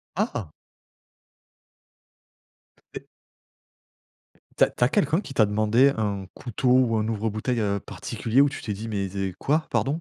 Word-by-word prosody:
Ah! 165 Hz, -, -2 dB, 2.4 s
Et -, -, -8 dB, 1.5 s
Tu -, -, +6 dB
as -, -, +4 dB
tu -, -, -2 dB
as 120 Hz, -, +4 dB
quelqu'un 155 Hz, +1 st, +2 dB
qui 140 Hz, -, -9 dB
t'a 110 Hz, -5 st, +4 dB
demandé 110 Hz, +6 st, +3 dB
un 100 Hz, -3 st, -2 dB
couteau 125 Hz, +1 st, -2 dB
ou 125 Hz, -3 st, +4 dB
un 105 Hz, 0 st, 0 dB
ouvre 110 Hz, 0 st, -1 dB
bouteille, 115 Hz, +3 st, -2 dB
heu, 100 Hz, -1 st, 0 dB
particulier 115 Hz, +5 st, -1 dB
où 145 Hz, -, +4 dB
tu -, -, -8 dB
t'es 105 Hz, -, -3 dB
dit: 110 Hz, +3 st, -6 dB
«Mais 100 Hz, -2 st, -2 dB
zé 95 Hz, 0 st, -3 dB
quoi, 155 Hz, +3 st, +1 dB
pardon»? 135 Hz, -, +1 dB
110 Hz, 155 wpm, -25 LUFS, 105-130 Hz, 2.4 s, Tu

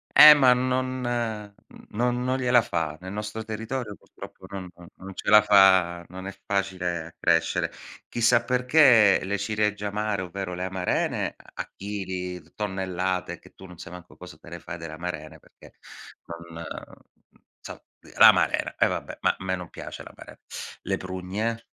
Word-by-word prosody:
E 150 Hz, 0 st, +12 dB
ma 130 Hz, -3 st, +6 dB
non 130 Hz, +1 st, -1 dB
n 110 Hz, -4 st, -3 dB, 0.4 s
non 125 Hz, +3 st, 0 dB
non 130 Hz, +1 st, 0 dB
gliela 125 Hz, -2 st, +4 dB
fa. 80 Hz, -6 st, -3 dB
Nel 95 Hz, +1 st, -7 dB
nostro 105 Hz, +1 st, -5 dB
territorio 110 Hz, 0 st, -5 dB
purtroppo 95 Hz, -, -13 dB
non 95 Hz, -2 st, -7 dB
non 85 Hz, -1 st, -14 dB
non 95 Hz, 0 st, -10 dB
ce -, -, -4 dB
la 105 Hz, 0 st, +8 dB
fa 95 Hz, -4 st, +5 dB
non 95 Hz, +1 st, -8 dB
è 100 Hz, -, -8 dB
facile 95 Hz, -4 st, -2 dB
a 80 Hz, -, -12 dB
crescere. 85 Hz, -1 st, +1 dB, 0.4 s
Chissà 120 Hz, 0 st, +3 dB
perché 125 Hz, -4 st, +5 dB
le 100 Hz, +1 st, -2 dB
ciliegie 105 Hz, 0 st, -1 dB
amare, 105 Hz, -1 st, -2 dB
ovvero 90 Hz, 0 st, -5 dB
le 90 Hz, +1 st, -4 dB
amarene, 95 Hz, -1 st, -1 dB
a -, -, -9 dB
chili, 95 Hz, -3 st, -5 dB
tonnellate, 95 Hz, -2 st, -3 dB
che -, -, -19 dB
tu 95 Hz, -, -13 dB
non 90 Hz, -2 st, -13 dB
sai 85 Hz, -, -9 dB
manco 90 Hz, -1 st, -12 dB
cosa 90 Hz, -4 st, -12 dB
te 85 Hz, -, -15 dB
le 85 Hz, 0 st, -8 dB
fai 85 Hz, +1 st, -8 dB
delle 80 Hz, -2 st, -8 dB
amarene, 80 Hz, -2 st, -7 dB
perché -, -, -19 dB, 0.7 s
non 85 Hz, 0 st, -8 dB, 0.9 s
inso -, -, -10 dB, 0.4 s
l'amarena, -, -, +5 dB
e -, -, +4 dB
vabbè, -, -, -5 dB
ma -, -, +2 dB
a -, -, -8 dB
me 95 Hz, 0 st, -1 dB
non 90 Hz, -2 st, -8 dB
piace -, -, -9 dB
l'amaren -, -, -13 dB, 0.5 s
Le -, -, -1 dB
prugne, 95 Hz, +5 st, -4 dB
95 Hz, 160 wpm, -25 LUFS, 90-110 Hz, 0.9 s, E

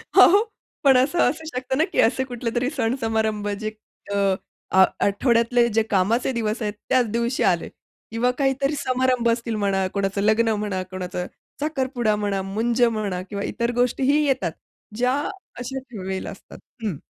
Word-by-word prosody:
हो, 400 Hz, +4 st, +7 dB, 0.4 s
पण 270 Hz, -2 st, +6 dB
असं 280 Hz, +7 st, +2 dB
असू 320 Hz, +4 st, -6 dB
शकतं 260 Hz, -3 st, -3 dB
ना 310 Hz, -, +4 dB
की -, -, 0 dB
असे 260 Hz, +3 st, +2 dB
कुठलेतरी 245 Hz, 0 st, -2 dB
सण 225 Hz, +3 st, +1 dB
समारंभ 220 Hz, -2 st, 0 dB
जे 215 Hz, -1 st, -3 dB, 0.4 s
अ, -, -, 0 dB, 0.5 s
आ 190 Hz, 0 st, +7 dB, 0.2 s
आठवड्यातले 235 Hz, +3 st, +3 dB
जे 225 Hz, -, +5 dB
कामाचे 215 Hz, +7 st, +2 dB
दिवस 220 Hz, +1 st, -1 dB
आहेत 210 Hz, -1 st, -1 dB, 0.2 s
त्याच 255 Hz, -2 st, +3 dB
दिवशी 235 Hz, +3 st, 0 dB
आले -, -, -2 dB, 0.4 s
किंवा 235 Hz, +2 st, +1 dB
काहीतरी 275 Hz, +1 st, +1 dB
समारंभ 255 Hz, -2 st, +1 dB
असतील 230 Hz, -1 st, -1 dB
म्हणा, 195 Hz, -2 st, +1 dB
कोणाचं 200 Hz, 0 st, -1 dB
लग्न 220 Hz, +2 st, +3 dB
म्हणा, 190 Hz, -3 st, -2 dB
कोणाचा 180 Hz, -1 st, -4 dB, 0.4 s
साखरपुडा 260 Hz, -7 st, 0 dB
म्हणा, 205 Hz, -2 st, -1 dB
मुंज 225 Hz, +5 st, -1 dB
म्हणा 215 Hz, -6 st, 0 dB
किंवा 200 Hz, -1 st, -4 dB
इतर 235 Hz, +2 st, -1 dB
गोष्टीही 260 Hz, +4 st, +2 dB
येतात. 260 Hz, -, 0 dB, 0.5 s
ज्या 250 Hz, +1 st, +2 dB, 0.5 s
अशाच 260 Hz, +2 st, -5 dB, 0.2 s
वेळेला 190 Hz, 0 st, -4 dB
असतात. 195 Hz, -, -13 dB, 0.3 s
हं. 205 Hz, -8 st, -1 dB
230 Hz, 155 wpm, -23 LUFS, 205-255 Hz, 0.5 s, हो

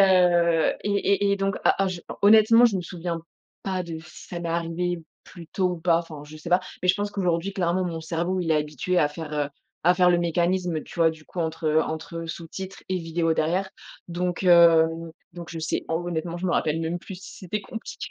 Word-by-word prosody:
heu, 175 Hz, -3 st, +4 dB
et 205 Hz, -, -1 dB, 0.4 s
et 200 Hz, -, +3 dB
et 200 Hz, -, +2 dB
donc, 195 Hz, 0 st, -1 dB
heu, -, -, -8 dB
a 195 Hz, -, +3 dB
a -, -, +1 dB
je 180 Hz, -2 st, -5 dB, 0.2 s
honnêtement, 220 Hz, +3 st, +7 dB
je 220 Hz, -5 st, +4 dB
me 180 Hz, -, -2 dB
souviens 170 Hz, -1 st, -4 dB, 0.4 s
pas 190 Hz, -2 st, -2 dB
de 165 Hz, -1 st, -6 dB
si 155 Hz, -1 st, -13 dB
ça 175 Hz, -1 st, -5 dB
m'est 170 Hz, -, -4 dB
arrivé 170 Hz, +1 st, -1 dB, 0.3 s
plus 170 Hz, -3 st, -12 dB
tôt 185 Hz, +1 st, 0 dB
ou 175 Hz, -, -4 dB
pas, 165 Hz, -1 st, +3 dB
enfin, 155 Hz, -4 st, -8 dB
je 155 Hz, +1 st, -11 dB
sais 155 Hz, +3 st, -8 dB
pas. 180 Hz, +1 st, +5 dB, 0.2 s
Mais 180 Hz, -, 0 dB
je 180 Hz, -, +6 dB
pense 205 Hz, +1 st, -2 dB
qu'aujourd'hui 180 Hz, -1 st, -1 dB
clairement, 180 Hz, 0 st, +1 dB
mon 165 Hz, -2 st, -3 dB
cerveau, 175 Hz, +3 st, -1 dB
il 165 Hz, -, -2 dB
est 160 Hz, -, +5 dB
habitué 150 Hz, +4 st, -1 dB
à 150 Hz, -, +3 dB
faire, 150 Hz, 0 st, -8 dB
heu, 145 Hz, -1 st, 0 dB, 0.3 s
à 175 Hz, +2 st, +5 dB
faire 180 Hz, -1 st, +5 dB
le 175 Hz, -, +3 dB
mécanisme, 175 Hz, -1 st, 0 dB
tu -, -, -13 dB
vois, 165 Hz, -1 st, +4 dB
du 160 Hz, -1 st, -13 dB
coup 175 Hz, -, -6 dB
entre 160 Hz, -1 st, +1 dB
entre 165 Hz, +1 st, -5 dB
sous-titres 175 Hz, +4 st, -7 dB
et 185 Hz, -, +1 dB
vidéos 165 Hz, 0 st, 0 dB
derrière. 175 Hz, +5 st, 0 dB, 0.4 s
Donc, 180 Hz, +1 st, -2 dB
hem, 165 Hz, -2 st, +5 dB, 0.2 s
donc 170 Hz, -1 st, -9 dB
je 165 Hz, -, -6 dB
sais 160 Hz, -, -2 dB
en 160 Hz, -, 0 dB
honnêtement, 170 Hz, 0 st, -3 dB
je 175 Hz, -, -6 dB
me 175 Hz, -, +1 dB
rappelle 155 Hz, +1 st, +1 dB
même 165 Hz, +2 st, -2 dB
plus 190 Hz, -, -8 dB
si -, -, -11 dB
c'était 200 Hz, +3 st, -4 dB
compliqué 225 Hz, +3 st, -7 dB
170 Hz, 230 wpm, -25 LUFS, 165-185 Hz, 0.4 s, honnêtement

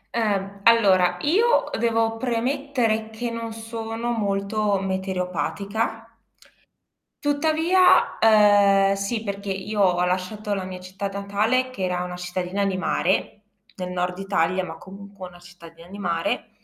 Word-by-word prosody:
Ehm, 200 Hz, -3 st, -1 dB
allora, 190 Hz, -6 st, +4 dB
io 435 Hz, +11 st, +2 dB
devo 225 Hz, -1 st, +1 dB
premettere 240 Hz, -2 st, -1 dB
che 230 Hz, +2 st, -5 dB
non 230 Hz, -1 st, -5 dB
sono 225 Hz, +1 st, -5 dB
molto 205 Hz, -1 st, 0 dB
meteoropatica. 195 Hz, +4 st, -3 dB, 1.1 s
Tuttavia, 320 Hz, +5 st, +3 dB
ehm, 205 Hz, -2 st, +5 dB
sì, 205 Hz, +3 st, -3 dB
perché 200 Hz, -1 st, -5 dB
io 195 Hz, +2 st, -3 dB
ho 180 Hz, -2 st, +3 dB
lasciato 190 Hz, +3 st, -2 dB
la 190 Hz, -2 st, -3 dB
mia 185 Hz, -1 st, -7 dB
città 190 Hz, +2 st, -5 dB
natale 205 Hz, +6 st, 0 dB
che 200 Hz, -7 st, -6 dB
era 180 Hz, 0 st, -1 dB
una 180 Hz, 0 st, -6 dB
cittadina 180 Hz, +2 st, -2 dB
di 195 Hz, -1 st, -1 dB
mare, 190 Hz, +2 st, -1 dB, 0.3 s
nel 180 Hz, -1 st, -5 dB
nord 180 Hz, 0 st, -2 dB
Italia, 185 Hz, -1 st, 0 dB
ma 160 Hz, -, -7 dB
comunque 195 Hz, 0 st, -11 dB
una 175 Hz, -, -16 dB
cittadina 170 Hz, -1 st, -15 dB
di 195 Hz, +3 st, -10 dB
mare, 170 Hz, -1 st, -2 dB
200 Hz, 130 wpm, -23 LUFS, 185-225 Hz, 1.1 s, ehm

